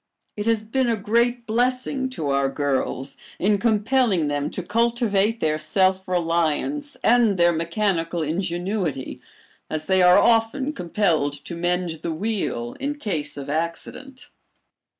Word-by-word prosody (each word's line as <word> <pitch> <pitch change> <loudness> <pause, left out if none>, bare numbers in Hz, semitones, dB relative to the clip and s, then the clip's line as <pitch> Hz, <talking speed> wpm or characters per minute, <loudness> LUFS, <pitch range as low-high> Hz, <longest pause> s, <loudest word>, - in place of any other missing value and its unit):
It 210 +1 -4
has 225 -2 +2
been 245 +3 0
a 230 - +2
great 235 +3 0
blessing 255 +3 0
to 160 - -4
our 140 0 +2
girls 135 -1 -2 0.2
in 205 +1 +2
compelling 215 - +2
them 145 0 -1
to 185 - -5
cultivate 225 0 +1
their 155 -4 0
self 190 +4 +1
reliance 175 - -1
and 230 -4 +4
their 175 0 +4
mechanical 170 0 -1
ingenuity, 175 -2 -3 0.5
as 155 0 -3
they 190 -1 +3
are 180 +1 +7
often 235 +6 +2
compelled 170 - 0
to - - -6
mend 175 -1 -1
the 170 - -3
wheel 160 - -2
in 285 +1 -2
case 160 - -3
of 140 - -6
accident. 170 - -5
190 Hz, 135 wpm, -23 LUFS, 160-230 Hz, 0.5 s, are